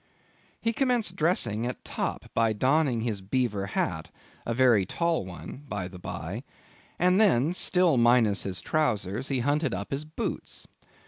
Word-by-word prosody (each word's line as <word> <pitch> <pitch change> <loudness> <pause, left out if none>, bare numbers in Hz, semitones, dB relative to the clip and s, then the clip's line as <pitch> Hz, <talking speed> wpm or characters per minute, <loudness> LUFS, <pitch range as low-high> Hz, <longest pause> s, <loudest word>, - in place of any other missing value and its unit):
He 230 - 0
commenced 240 -7 +1
dressing 120 - +1
at 125 - -6
top - - -4
by 115 -1 +2
donning 130 +1 +2
his 110 -4 -2
beaver 105 -1 -1
hat, 80 -5 -2 0.4
a 115 - 0
very 120 -5 +5
tall 165 - -1
one, 95 +8 -9
by 100 -3 -3
the 90 -1 -11
by, - - -5 0.5
and 180 +3 +4
then—still 175 - +3
minus 120 -4 +4
his 90 -3 -3
trowsers—he 125 - 0
hunted 145 -2 +1
up 100 +2 -6
his 140 +2 -1
boots. 155 +1 -5
125 Hz, 140 wpm, -27 LUFS, 105-155 Hz, 0.5 s, very